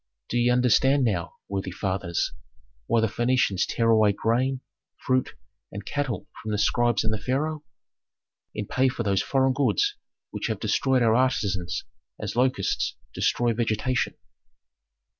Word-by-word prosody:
"Do 120 Hz, -, -1 dB
ye 120 Hz, +1 st, +3 dB
understand 125 Hz, +3 st, +4 dB
now, 95 Hz, -8 st, -1 dB
worthy 95 Hz, -1 st, -3 dB
fathers, 95 Hz, -2 st, -2 dB, 0.5 s
why 115 Hz, -, +3 dB
the -, -, +3 dB
Phœnicians 120 Hz, -4 st, +1 dB
tear 115 Hz, -1 st, +2 dB
away 110 Hz, -2 st, +5 dB
grain, 125 Hz, +5 st, 0 dB, 0.4 s
fruit, 130 Hz, -1 st, +1 dB, 0.4 s
and 100 Hz, 0 st, -7 dB
cattle 140 Hz, -4 st, -3 dB
from 110 Hz, -, -6 dB
the 105 Hz, -, 0 dB
scribes 120 Hz, +1 st, +2 dB
and 110 Hz, 0 st, 0 dB
the 110 Hz, -, -2 dB
pharaoh? 150 Hz, +4 st, -1 dB, 0.9 s
In -, -, -3 dB
pay 130 Hz, +1 st, +2 dB
for 120 Hz, -, -3 dB
those 100 Hz, -2 st, +1 dB
foreign 135 Hz, -1 st, +2 dB
goods 410 Hz, -, +1 dB, 0.3 s
which -, -, -3 dB
have -, -, -2 dB
destroyed 130 Hz, -2 st, +2 dB
our 110 Hz, -1 st, +4 dB
artisans 100 Hz, -8 st, 0 dB, 0.4 s
as -, -, -4 dB
locusts 125 Hz, -5 st, +1 dB, 0.2 s
destroy 120 Hz, -1 st, +1 dB
vegetation. 115 Hz, +2 st, 0 dB
120 Hz, 140 wpm, -26 LUFS, 105-130 Hz, 0.9 s, away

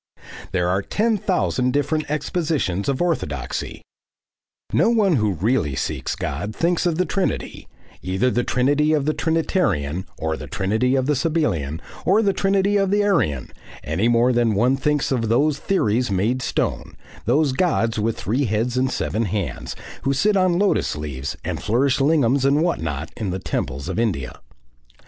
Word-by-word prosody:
There 90 Hz, -2 st, +1 dB
are 95 Hz, +2 st, +1 dB
ten 220 Hz, -, 0 dB
thousand 130 Hz, -9 st, 0 dB
different 145 Hz, +2 st, 0 dB
expositions 150 Hz, -, -1 dB
of 135 Hz, +5 st, 0 dB
orthodoxy. 75 Hz, -, -3 dB, 0.9 s
No -, -, +4 dB
one 205 Hz, -9 st, +3 dB
who 105 Hz, -3 st, +1 dB
really 90 Hz, -, 0 dB
seeks -, -, -2 dB
God 105 Hz, +2 st, -4 dB
thinks 175 Hz, +1 st, +1 dB
of 170 Hz, -, +1 dB
the 185 Hz, -, +2 dB
Trinity, 195 Hz, -, -2 dB, 0.3 s
either 95 Hz, +8 st, 0 dB
the 120 Hz, -, +1 dB
Trinity 145 Hz, +6 st, +2 dB
of 145 Hz, -3 st, +1 dB
the 155 Hz, -, +1 dB
Trinitarian 105 Hz, -, 0 dB
or 80 Hz, 0 st, -2 dB
the -, -, -8 dB
Trinity 110 Hz, +7 st, 0 dB
of 130 Hz, -1 st, +1 dB
the 150 Hz, +1 st, +1 dB
Sabellian 120 Hz, -, 0 dB, 0.2 s
or 210 Hz, +4 st, +3 dB
the 200 Hz, -2 st, +2 dB
Trinity 195 Hz, +1 st, +2 dB
of 195 Hz, -1 st, +1 dB
the 205 Hz, +1 st, +2 dB
Arian, 120 Hz, -, 0 dB, 0.3 s
any 85 Hz, +9 st, 0 dB
more 120 Hz, +1 st, +3 dB
than 120 Hz, -3 st, +2 dB
one 125 Hz, +6 st, +3 dB
thinks 150 Hz, +1 st, 0 dB
of 115 Hz, -4 st, 0 dB
those 140 Hz, +5 st, +2 dB
theories 125 Hz, -, +1 dB
made 105 Hz, +7 st, 0 dB
stone, -, -, -2 dB, 0.3 s
those 150 Hz, -1 st, +3 dB
gods 130 Hz, -7 st, +1 dB
with 110 Hz, +1 st, -1 dB
three 130 Hz, +7 st, 0 dB
heads 115 Hz, +3 st, -1 dB
and 130 Hz, +1 st, +2 dB
seven 115 Hz, -1 st, -1 dB
hands, 95 Hz, -, -3 dB, 0.3 s
who 135 Hz, +2 st, +1 dB
sit 210 Hz, +9 st, +2 dB
on 185 Hz, -2 st, +3 dB
lotus 200 Hz, +1 st, +1 dB
leaves 70 Hz, -3 st, -5 dB
and -, -, -3 dB
flourish 130 Hz, +5 st, +1 dB
lingams 140 Hz, -3 st, +3 dB
and 140 Hz, +3 st, +3 dB
what 175 Hz, -, 0 dB
not, 80 Hz, 0 st, -4 dB
in 110 Hz, -5 st, -3 dB
the 90 Hz, -, -2 dB
temples 70 Hz, -6 st, -3 dB
of -, -, -2 dB
India. 75 Hz, -, -2 dB
125 Hz, 165 wpm, -22 LUFS, 100-160 Hz, 0.9 s, No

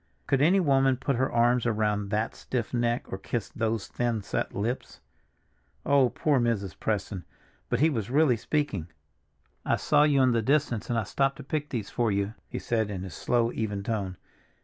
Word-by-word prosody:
Could 135 Hz, -1 st, +1 dB
any 180 Hz, +6 st, +5 dB
woman 135 Hz, -5 st, +3 dB
put 135 Hz, +1 st, -1 dB
her 130 Hz, +2 st, +1 dB
arms 120 Hz, 0 st, +3 dB
around 105 Hz, -2 st, 0 dB
that 110 Hz, +2 st, -1 dB
stiff 120 Hz, -2 st, -4 dB
neck 120 Hz, 0 st, 0 dB
or 95 Hz, -, -3 dB
kiss 115 Hz, +2 st, -3 dB
those 115 Hz, -2 st, -2 dB
thin, 120 Hz, -3 st, -1 dB
set -, -, -3 dB
lips? 115 Hz, +6 st, -3 dB, 0.9 s
Oh, 140 Hz, -3 st, +4 dB
poor 145 Hz, 0 st, +1 dB
Mrs. 115 Hz, -6 st, 0 dB
Preston! 100 Hz, -3 st, -2 dB, 0.5 s
But 125 Hz, +1 st, 0 dB
he 160 Hz, +1 st, +5 dB
was 115 Hz, -5 st, -2 dB
really 140 Hz, -1 st, +4 dB
speaking. 115 Hz, -, -2 dB, 0.8 s
"I -, -, +2 dB
saw 145 Hz, -1 st, +3 dB
you 145 Hz, -3 st, +4 dB
in 130 Hz, -, +4 dB
the 115 Hz, -1 st, +2 dB
distance 135 Hz, -3 st, +1 dB
and 120 Hz, -, +1 dB
I 115 Hz, -, +1 dB
stopped 135 Hz, +6 st, 0 dB
to -, -, -9 dB
pick 150 Hz, +2 st, -3 dB
these 110 Hz, -5 st, -4 dB
for 120 Hz, -3 st, +1 dB
you," 100 Hz, +1 st, -1 dB, 0.2 s
he -, -, -5 dB
said 110 Hz, -3 st, -1 dB
in 95 Hz, -3 st, -4 dB
his 95 Hz, -3 st, -7 dB
slow, 120 Hz, -1 st, +1 dB
even 105 Hz, -4 st, -3 dB
tone. 100 Hz, -4 st, -3 dB
120 Hz, 190 wpm, -28 LUFS, 105-135 Hz, 0.9 s, any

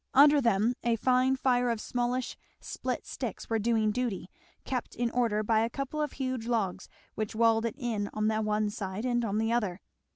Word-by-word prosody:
Under 290 Hz, +1 st, +7 dB
them 230 Hz, 0 st, +2 dB
a 235 Hz, -1 st, +2 dB
fine 255 Hz, +3 st, +3 dB
fire 250 Hz, -2 st, +2 dB
of 230 Hz, -2 st, -1 dB
smallish 245 Hz, +2 st, -2 dB, 0.2 s
split -, -, -4 dB
sticks -, -, -6 dB
was 225 Hz, -1 st, +2 dB
doing 220 Hz, -1 st, +2 dB
duty, 215 Hz, -6 st, -3 dB, 0.3 s
kept 255 Hz, -3 st, -3 dB
in 235 Hz, -1 st, -1 dB
order 230 Hz, -4 st, +1 dB
by 220 Hz, +1 st, +3 dB
a 225 Hz, +1 st, +1 dB
couple 275 Hz, +4 st, -3 dB
of 300 Hz, -, -2 dB
huge 255 Hz, -4 st, -3 dB
logs 220 Hz, -6 st, -1 dB, 0.2 s
which 215 Hz, 0 st, -4 dB
walled 225 Hz, 0 st, +3 dB
it 230 Hz, -, -5 dB
in 225 Hz, -6 st, -2 dB
on 215 Hz, 0 st, 0 dB
the 220 Hz, 0 st, +1 dB
one 210 Hz, 0 st, 0 dB
side 195 Hz, +2 st, -4 dB
and 240 Hz, -1 st, +1 dB
on 210 Hz, -2 st, -1 dB
the 225 Hz, +1 st, +1 dB
other. 205 Hz, -6 st, 0 dB
230 Hz, 195 wpm, -29 LUFS, 215-250 Hz, 0.3 s, Under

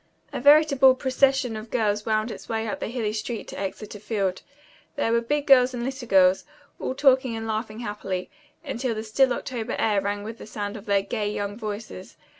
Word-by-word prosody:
A -, -, -2 dB
veritable 280 Hz, -2 st, +6 dB
procession 260 Hz, -2 st, +1 dB
of 215 Hz, +1 st, -7 dB
girls 210 Hz, -3 st, 0 dB
wound 215 Hz, +1 st, +1 dB
its -, -, -10 dB
way 225 Hz, 0 st, -1 dB
up -, -, -3 dB
the -, -, -3 dB
hilly 225 Hz, -3 st, -2 dB
street 220 Hz, +1 st, -4 dB
to -, -, -7 dB
Exeter 205 Hz, +2 st, -5 dB
Field. 200 Hz, -3 st, -2 dB, 0.5 s
There 285 Hz, -6 st, 0 dB
were 235 Hz, 0 st, +3 dB
big 290 Hz, +5 st, -1 dB
girls 255 Hz, -2 st, +5 dB
and 235 Hz, -, -3 dB
little 265 Hz, -2 st, -5 dB
girls, 190 Hz, -2 st, +4 dB, 0.4 s
all 260 Hz, -, -3 dB
talking 265 Hz, -3 st, +3 dB
and 225 Hz, 0 st, -5 dB
laughing 220 Hz, 0 st, -3 dB
happily, 205 Hz, -4 st, -4 dB, 0.3 s
until 255 Hz, -3 st, -2 dB
the 215 Hz, -, -4 dB
still 255 Hz, +4 st, +2 dB
October 240 Hz, -2 st, -3 dB
air 210 Hz, -3 st, +2 dB
rang 205 Hz, +1 st, -2 dB
with 225 Hz, +2 st, -7 dB
the -, -, -10 dB
sound 205 Hz, -1 st, -5 dB
of 215 Hz, 0 st, -10 dB
their 200 Hz, -1 st, +2 dB
gay, 210 Hz, 0 st, -2 dB
young 205 Hz, -1 st, -3 dB
voices. 210 Hz, -, -7 dB
225 Hz, 200 wpm, -25 LUFS, 210-255 Hz, 0.5 s, veritable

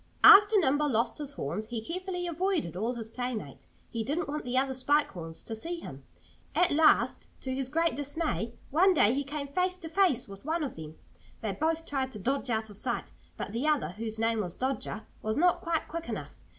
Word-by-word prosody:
After 415 Hz, +1 st, +10 dB
Nimble 295 Hz, -4 st, +3 dB
lost 230 Hz, 0 st, 0 dB
his 290 Hz, -1 st, -5 dB
horns 200 Hz, -, -3 dB
he 235 Hz, 0 st, -3 dB
carefully 360 Hz, -, -3 dB
avoided 345 Hz, -, -1 dB
all 225 Hz, +6 st, -1 dB
his 225 Hz, -2 st, -5 dB
playmates. 225 Hz, -, -5 dB, 0.2 s
He 230 Hz, -2 st, -2 dB
didn't 300 Hz, +7 st, -2 dB
want 300 Hz, +1 st, -3 dB
the 250 Hz, +1 st, -1 dB
other 265 Hz, 0 st, +2 dB
Spike 290 Hz, +3 st, +2 dB
Horns 165 Hz, -2 st, -6 dB
to 225 Hz, -, -5 dB
see 335 Hz, +10 st, -4 dB
him. -, -, -9 dB, 0.5 s
At 360 Hz, -, +4 dB
last, 310 Hz, +1 st, +4 dB
to 260 Hz, -, -3 dB
his 265 Hz, -1 st, -2 dB
great 330 Hz, +3 st, +2 dB
dismay, 285 Hz, -5 st, -2 dB, 0.2 s
one 365 Hz, +6 st, +5 dB
day 230 Hz, -6 st, +5 dB
he 280 Hz, +2 st, 0 dB
came 280 Hz, +1 st, -4 dB
face 365 Hz, +5 st, 0 dB
to 330 Hz, -3 st, -7 dB
face 330 Hz, -8 st, +2 dB
with 195 Hz, -1 st, -10 dB
one 320 Hz, +3 st, -1 dB
of 280 Hz, -, -4 dB
them. 155 Hz, -1 st, -9 dB, 0.4 s
They 215 Hz, -, -1 dB
both 320 Hz, -, -1 dB
tried 265 Hz, -3 st, -2 dB
to -, -, -6 dB
dodge 270 Hz, +5 st, -1 dB
out 220 Hz, -2 st, -1 dB
of 200 Hz, -, -8 dB
sight. -, -, -2 dB, 0.3 s
But -, -, -4 dB
the 240 Hz, +7 st, -1 dB
other, 300 Hz, -2 st, +2 dB
whose 220 Hz, +4 st, -5 dB
name 225 Hz, 0 st, +1 dB
was 180 Hz, -3 st, -5 dB
Dodger, 260 Hz, -4 st, -2 dB, 0.2 s
was 215 Hz, +1 st, -1 dB
not 350 Hz, +2 st, +3 dB
quite 335 Hz, -2 st, -1 dB
quick 335 Hz, +1 st, -5 dB
enough. -, -, -4 dB
270 Hz, 210 wpm, -29 LUFS, 225-325 Hz, 0.5 s, After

